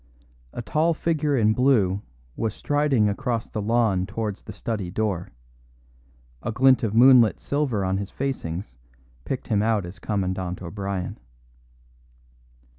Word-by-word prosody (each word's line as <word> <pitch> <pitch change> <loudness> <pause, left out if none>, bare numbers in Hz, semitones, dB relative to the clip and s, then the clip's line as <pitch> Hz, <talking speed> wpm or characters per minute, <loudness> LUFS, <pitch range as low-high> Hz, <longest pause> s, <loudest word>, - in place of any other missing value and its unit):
A 120 - -6
tall 160 +6 +1
figure 150 -3 0
in 110 -2 +3
blue 110 -7 +2 0.3
was 110 -2 -2
striding 145 -7 +2
across 115 +3 -2
the 105 - -4
lawn 105 -4 +1
towards 105 0 -4
the - - -9
study 105 -6 -4
door; 95 -2 -2 1.1
a - - -3
glint 130 +1 +4
of 110 -2 -1
moonlit 125 -2 +6
silver 135 -9 -1
on 95 +1 0
his 100 -1 -5
facings 90 - -4 0.5
picked 130 - -4
him 105 -3 +2
out 110 -3 +1
as 90 +3 -10
Commandant 95 -3 -2
O'Brien. 95 -1 -4
110 Hz, 130 wpm, -24 LUFS, 95-125 Hz, 1.1 s, moonlit